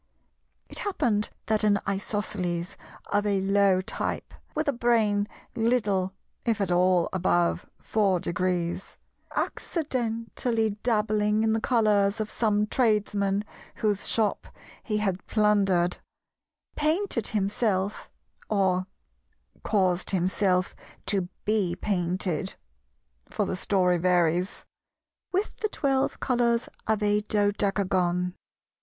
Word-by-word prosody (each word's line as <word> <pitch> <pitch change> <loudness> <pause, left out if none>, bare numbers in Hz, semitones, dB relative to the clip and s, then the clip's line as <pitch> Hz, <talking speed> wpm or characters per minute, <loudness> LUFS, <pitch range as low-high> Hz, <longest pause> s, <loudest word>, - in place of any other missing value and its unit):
It - - -6
happened 240 - 0 0.2
that 215 -1 +1
an 205 -1 +4
Isosceles 195 -3 -2 0.4
of 205 0 +2
a 200 -1 +2
low 195 -1 +3
type, 185 - -4 0.2
with 310 0 -1
a 285 - +2
brain 225 -4 +2 0.3
little 210 -6 +1 0.3
if 225 -3 0
at 195 -3 0
all 180 -1 +3
above 175 -2 +1
four 200 -4 +1
degrees—accidentally 225 - -2
dabbling 215 -2 +1
in 220 0 +2
the 225 - 0
colours 210 -4 +2
of 215 0 -3
some 210 -2 +2
Tradesman 210 -4 +1 0.3
whose 205 -2 0
shop 220 -2 0 0.3
he 215 -2 -2
had 195 -3 -1
plundered—painted 210 - 0
himself, 205 -1 -1 0.4
or 190 -3 +1 0.7
caused 185 -4 +1
himself 185 0 +1 0.3
to 190 -3 0 0.2
be 205 -5 +1
painted 185 -1 -1 0.7
(for 210 - -1
the 185 - -2
story 180 -2 +2
varies) 180 +1 +1 0.7
with 390 +3 -1
the 430 - -1
twelve 270 -7 0
colours 240 -2 +1 0.2
of 215 -1 +1
a 210 0 +3
Dodecagon. 195 -4 0
205 Hz, 100 wpm, -27 LUFS, 185-220 Hz, 0.7 s, an